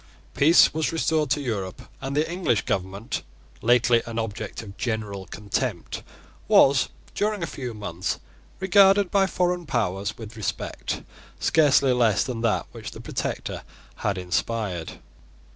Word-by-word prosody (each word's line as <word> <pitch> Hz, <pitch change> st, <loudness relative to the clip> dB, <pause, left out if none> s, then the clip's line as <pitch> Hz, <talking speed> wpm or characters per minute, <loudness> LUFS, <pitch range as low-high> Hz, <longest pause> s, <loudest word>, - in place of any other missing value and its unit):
Peace 160 Hz, +5 st, +6 dB
was 160 Hz, 0 st, 0 dB
restored 160 Hz, -2 st, +1 dB
to 145 Hz, -, +2 dB
Europe; 100 Hz, -8 st, -3 dB, 0.2 s
and 135 Hz, +1 st, -3 dB
the 155 Hz, -, +2 dB
English 170 Hz, -, 0 dB
government, 95 Hz, +3 st, -2 dB, 0.4 s
lately 120 Hz, 0 st, +4 dB
an 115 Hz, -1 st, -5 dB
object 110 Hz, 0 st, -4 dB
of 100 Hz, -2 st, -10 dB
general 105 Hz, -5 st, -3 dB
contempt, 100 Hz, +3 st, -3 dB, 0.5 s
was, 135 Hz, -2 st, +5 dB, 0.2 s
during 210 Hz, -3 st, 0 dB
a -, -, +1 dB
few 125 Hz, -7 st, -6 dB
months, 95 Hz, -4 st, -3 dB, 0.4 s
regarded 195 Hz, 0 st, +5 dB
by 195 Hz, -1 st, +4 dB
foreign 180 Hz, -2 st, 0 dB
powers 100 Hz, -5 st, -1 dB
with 110 Hz, -1 st, -9 dB
respect 110 Hz, -3 st, -3 dB, 0.4 s
scarcely 140 Hz, -4 st, +4 dB
less 115 Hz, -4 st, +3 dB
than 125 Hz, -4 st, -4 dB
that 115 Hz, -2 st, +1 dB
which -, -, -7 dB
the -, -, -11 dB
Protector -, -, -4 dB, 0.4 s
had 100 Hz, -1 st, -1 dB
inspired. 90 Hz, -1 st, -2 dB
120 Hz, 135 wpm, -25 LUFS, 105-155 Hz, 0.5 s, Peace